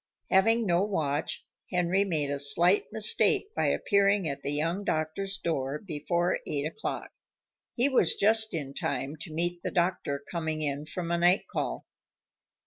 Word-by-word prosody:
Having 225 +4 +3
no 175 -2 +2
watch, 160 -7 -2 0.2
Henry 180 +2 +1
made 155 -7 -1
a 140 - -2
slight 170 +8 +4
mistake 220 - +4
by - - +1
appearing 200 -2 +2
at 140 -2 -4
the - - -4
young 165 +7 -1
doctor's 195 +4 -2
door 140 -4 -2
before 170 +1 -1
eight 145 -1 -2
o'clock. 165 +8 -5 0.6
He 245 +3 +2
was 255 - +3
just 220 +1 +2
in 140 -4 -5
time 140 +1 -3
to 160 +1 -8
meet 175 +2 -2
the - - -3
doctor 170 -6 -1
coming 160 -2 -2
in 145 +1 -3
from 170 -1 -4
a 170 - +1
night 175 +3 +4
call. - - -4
170 Hz, 155 wpm, -28 LUFS, 150-195 Hz, 0.6 s, slight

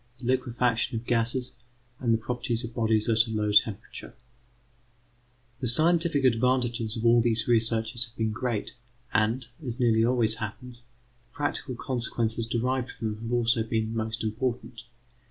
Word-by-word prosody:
THE 125 - -9
LIQUEFACTION 125 -1 0
OF 115 - -7
GASES, 120 +2 0 0.5
AND 120 -2 0
THE 115 - +4
PROPERTIES 120 0 -2
OF 115 0 -7
BODIES 110 -2 +1
AT 115 0 +3
A - - -7
LOW 105 -1 -1
TEMPERATURE 105 -1 0 1.4
The 130 - -2
scientific 160 +3 +4
advantages 120 -2 +1
of 115 - -3
all 120 0 +6
these 115 -1 0
researches 115 0 +1
have 115 -1 -18
been 110 -1 -1
great, 115 -1 -3 0.4
and, 115 +3 +1 0.2
as 125 -1 -3
nearly 115 -2 +3
always 115 -2 +2
happens, 120 +3 -7 0.5
the - - -33
practical 145 -2 -3
consequences 115 -2 -1
derived 125 +2 -1
from 110 -1 -4
them 105 +2 -10
have 115 - -4
also 120 0 +2
been 110 0 -2
most 110 0 -3
important. 115 +1 -3
115 Hz, 155 wpm, -27 LUFS, 110-125 Hz, 1.4 s, all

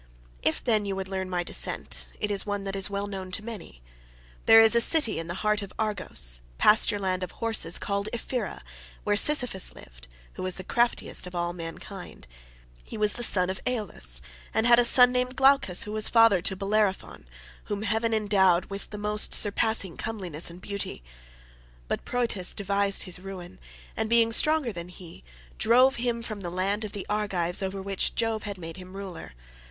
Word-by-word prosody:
If, 155 - 0
then, 215 -4 +1
you 195 -1 -3
would 190 0 -5
learn 190 -1 -4
my 175 -1 -1
descent, - - -2
it 210 - -2
is 200 - 0
one 205 -1 -4
that 195 0 -5
is 195 +1 +2
well 200 0 -3
known 190 -2 -7
to 215 +3 -4
many. 200 - -10 0.6
There 225 - +9
is 225 +1 +6
a 235 - +5
city 295 - +4
in 165 - -6
the 175 - -5
heart 210 0 +2
of 200 -2 -8
Argos, 180 - -2 0.2
pasture 210 0 +5
land 190 -2 -2
of 185 - -6
horses, 220 -7 -1
called 200 +1 -2
Ephyra, 235 - -4 0.4
where 205 - +1
Sisyphus 250 -6 +2
lived, - - -15 0.3
who - - -9
was 185 -1 -2
the 185 - -8
craftiest 235 -2 -1
of 180 - -10
all 175 0 -2
mankind. 175 - -9 0.6
He - - -9
was 210 -1 +2
the - - -5
son 185 -6 +7
of 190 - -7
Aeolus, 170 - +2 0.3
and 220 - +2
had 240 0 +6
a 240 - +4
son 250 +1 +7
named 250 +1 -1
Glaucus, 265 -9 +3
who 210 - -7
was 215 0 +1
father 225 -5 +5
to 190 - 0
Bellerophon, 195 - -2 0.4
whom 205 0 -4
heaven 225 +1 -1
endowed 195 -5 +2
with 195 0 -7
the 210 - -7
most 210 +1 0
surpassing 205 -3 0
comeliness 185 -8 -2
and 170 +1 -12
beauty. 200 - -5 0.8
But - - -4
Proetus 230 -7 -1
devised 200 0 0
his 180 -1 -4
ruin, 185 -1 -10 0.4
and 220 0 -2
being 230 -1 +3
stronger 305 -1 +2
than 170 -1 -7
he, 175 - -13 0.4
drove 255 +4 +4
him 235 -1 -2
from 215 -3 -6
the 180 -3 -5
land 195 +4 -2
of 210 - -6
the 200 - -6
Argives, 195 -4 -1
over 190 0 -4
which 195 -1 -1
Jove 225 -1 -1
had 205 -2 -6
made 165 -1 -9
him 185 0 -12
ruler. 190 - -9
200 Hz, 190 wpm, -26 LUFS, 185-225 Hz, 0.8 s, There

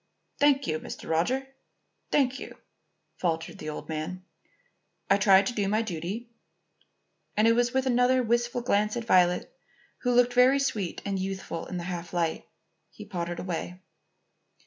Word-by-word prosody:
"Thank 285 -1 +4
you, 155 -6 -1
Mr. - - -8
Roger, 250 +12 0 0.6
thank 270 -2 +2
you," - - -9 0.6
faltered 165 -2 -2
the 155 - -5
old 150 - -6
man. 165 +4 -5 0.9
"I 195 - +6
try 195 -1 +6
to 245 - -2
do 205 -4 0
my 215 +3 +1
duty." 210 +5 -5 1.1
And 215 +1 +5
with 245 +2 +1
another 250 0 +3
wistful 240 +1 0
glance 210 -2 +1
at 235 - -4
Violet, 180 - +3 0.4
who 245 - -1
looked 245 0 +4
very 250 +2 +6
sweet 215 -10 -2
and 195 -1 -1
youthful 190 -3 -4
in 180 - -5
the 175 - -4
half 175 -1 -5
light, 170 -2 -1 0.4
he - - -11
pottered 175 -1 -4
away. 180 0 -4
205 Hz, 145 wpm, -28 LUFS, 175-245 Hz, 1.1 s, I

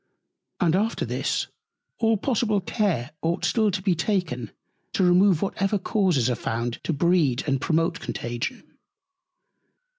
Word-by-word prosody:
And 175 -3 +3
after 215 +4 0
this - - -1 0.5
all 225 -1 +3
possible 215 -2 +1
Care 185 - -1
ought 170 +2 0
still 215 +4 +2
to 190 -1 -3
be 185 - +3
taken 160 - -1 0.4
to - - +1
remove 180 -1 +4
whatever 195 +1 0
Causes 185 - +1
are 125 - +1
found 115 +1 -3
to - - 0
breed 155 -4 +2
and 135 -3 0
promote 165 +1 +1
Contagion. 120 - -5
180 Hz, 130 wpm, -25 LUFS, 145-200 Hz, 0.5 s, remove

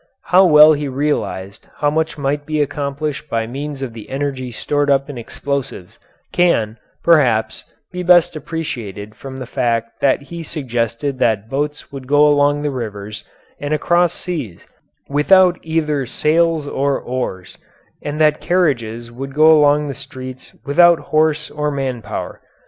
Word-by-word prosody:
How 185 +2 +5
well 150 -1 +8
he 145 -1 -2
realized 130 -8 -3
how 145 0 +1
much 160 +1 -1
might 145 +1 -1
be 155 -1 -1
accomplished 145 +1 -3
by 115 -1 -1
means 140 +3 -5
of 125 -4 -5
the 110 -2 -10
energy 135 -2 -3
stored 145 +5 -1
up 140 +1 +2
in - - -9
explosives, 130 -6 -5 0.3
can, 115 -11 +2 0.2
perhaps, 130 -10 +3 0.3
be 180 - -5
best 175 -1 +4
appreciated 115 - -6
from 135 +2 -9
the 130 - -6
fact 115 -1 -2
that 140 0 +2
he 170 +4 -8
suggested 130 -3 -3
that 110 -3 0
boats 145 +2 -3
would 135 -2 -8
go 145 +2 +5
along 145 0 +3
the 145 - -1
rivers 105 -4 -6 0.4
and 145 +1 -1
across 175 +2 +2
seas 145 - -6 0.4
without 180 +5 +4
either 150 -4 -1
sails 160 +3 +1
or 140 -1 0
oars, 105 -8 -5 0.4
and 145 +1 -4
that 155 -1 +3
carriages 120 -10 0
would 135 +3 -7
go 155 +1 +7
along 150 0 +3
the 140 - -4
streets 130 0 -10
without 170 +4 +5
horse 155 -1 0
or 150 0 -2
man 135 -4 -3
power. 105 - -6
145 Hz, 150 wpm, -18 LUFS, 125-155 Hz, 0.4 s, well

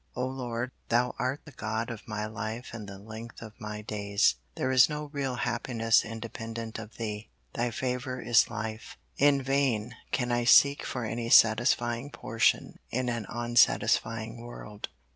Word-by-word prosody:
O 125 - -1
Lord, 125 -1 -3 0.2
Thou 120 +2 +2
art 130 +3 -1
the 145 - -11
God 110 -1 -3
of 115 -2 -9
my 105 -1 -3
life 110 +3 -5
and 105 -3 -7
the 100 - -8
length 110 +4 -9
of 110 -2 -10
my 105 0 -5
days. 100 -1 +1 0.2
There 130 - -1
is 130 +2 +6
no 150 -1 -5
real 135 -3 -1
happiness 115 -2 +1
independent 115 0 -6
of 115 0 -10
Thee. 105 -1 -4 0.2
Thy 120 +1 0
favor 125 +2 -3
is 120 -2 +4
life. 110 -1 -6 0.2
In 140 -1 +4
vain 130 -5 +1 0.2
can 125 -2 0
I 120 0 +1
seek 140 +3 +6
for 125 -3 -3
any 115 +1 -3
satisfying 120 +3 +4
portion 115 -5 0
in 125 +1 -1
an 115 -4 -3
unsatisfying 115 -1 +2
world. 105 -3 -8
115 Hz, 160 wpm, -29 LUFS, 110-125 Hz, 0.2 s, is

